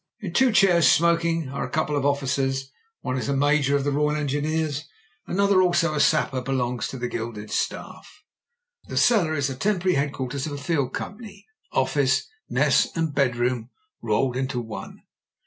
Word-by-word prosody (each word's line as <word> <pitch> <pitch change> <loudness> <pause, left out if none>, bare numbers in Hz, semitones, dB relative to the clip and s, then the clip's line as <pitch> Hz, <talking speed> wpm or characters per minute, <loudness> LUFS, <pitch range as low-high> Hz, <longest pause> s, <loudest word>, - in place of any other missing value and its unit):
In - - -6
two 260 -2 +4
chairs, 175 - +5
smoking, 165 -2 +2
are 140 - -4
a - - -5
couple 155 -1 -1
of 140 -1 +1
officers. 135 -1 -1 0.3
One 130 - -2
is 130 - -3
a 140 - +1
major 145 0 +2
of 140 - +1
the 145 - 0
Royal 150 +1 +1
Engineers, 150 +1 -1 0.4
and - - -3
another, 200 -1 +4
also 175 -3 +2
a 150 - -1
sapper, 145 -4 +2
belongs 125 -2 -2
to 135 - -7
the 125 0 -3
gilded 110 -3 -6
staff. - - -4 0.8
The - - -5
cellar 185 -10 +3
is 140 -2 0
the 135 - -3
temporary 185 +3 0
headquarters 140 -1 -2
of 145 - -5
a - - -4
field 140 -2 -1
company 205 -1 -8 0.2
— - - -43
office, 135 0 +1 0.2
mess, - - +3
and 160 -2 -1
bedroom 125 -3 0 0.3
rolled 130 -2 0
into 130 -1 -2
one. 110 -2 -8
145 Hz, 175 wpm, -24 LUFS, 130-165 Hz, 0.8 s, chairs